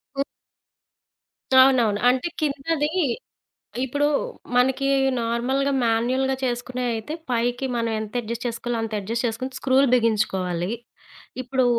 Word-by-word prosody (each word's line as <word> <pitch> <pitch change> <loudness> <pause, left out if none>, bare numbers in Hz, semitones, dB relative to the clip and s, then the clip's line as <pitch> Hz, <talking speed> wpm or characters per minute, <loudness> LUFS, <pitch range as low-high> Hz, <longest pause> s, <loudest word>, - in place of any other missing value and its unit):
ఉ 275 - 0 1.4
అవునవును. 235 -6 +3
అంటే, 255 +6 +2
కిందది 295 +1 0 0.9
ఇప్పుడు 285 +3 0 0.5
మనకి 265 +2 +3 0.3
నార్మల్‌గా, 250 +4 0
మాన్యుయల్‌గా 250 +4 +1
చేసుకునేయ్ 245 0 -2
అయితే 225 +8 -5 0.2
పైకి 245 +2 0
మనం 230 -1 0
ఎంత 215 +1 -7
అడ్జస్ట్ 235 +2 -5
చేసుకోవాలో 235 0 -2
అంత 225 -1 -4
అడ్జస్ట్ 230 +5 -3
చేసుకొని 255 +4 -4
స్క్రూలు 270 +1 +3
బిగించుకోవాలి. 195 -6 +1 0.7
ఇప్పుడు 260 +1 +1
245 Hz, 105 wpm, -24 LUFS, 230-265 Hz, 1.4 s, అవునవును